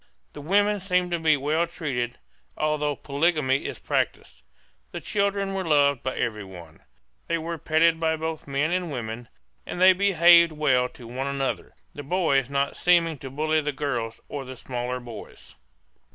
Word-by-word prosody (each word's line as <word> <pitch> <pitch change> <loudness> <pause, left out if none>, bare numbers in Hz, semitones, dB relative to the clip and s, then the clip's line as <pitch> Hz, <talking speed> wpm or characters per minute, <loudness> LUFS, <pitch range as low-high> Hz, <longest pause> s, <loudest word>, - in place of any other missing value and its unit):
The 145 - -8
women 205 +6 +2
seemed 180 -2 0
to 170 - 0
be 155 -2 +3
well 155 +5 0
treated, 130 -8 -3 0.4
although 150 -1 0
polygamy 140 -2 0
is - - -4
practised. - - -2 0.5
The - - -6
children 200 -1 -1
were 190 -1 -2
loved 145 -5 +3
by 130 - -3
every 110 -3 -2
one; 85 -4 -12 0.5
they 170 - 0
were 165 0 -5
petted 160 +2 +3
by 160 -1 +1
both 160 -1 -5
men 140 +4 0
and 180 -2 -1
women, 120 -2 -5 0.4
and - - -6
they 185 +1 +8
behaved 170 -3 +5
well 130 -5 +2
to 125 -1 -14
one 130 +4 -4
another, 140 -1 -3 0.2
the 145 - -7
boys 140 -4 +1
not 140 0 0
seeming 170 -4 +2
to 135 - -7
bully 155 +3 0
the 150 0 -2
girls 120 -6 -3
or 145 -2 -5
the 130 0 -9
smaller 125 0 -4
boys. 120 -2 -11
150 Hz, 165 wpm, -25 LUFS, 130-170 Hz, 0.5 s, they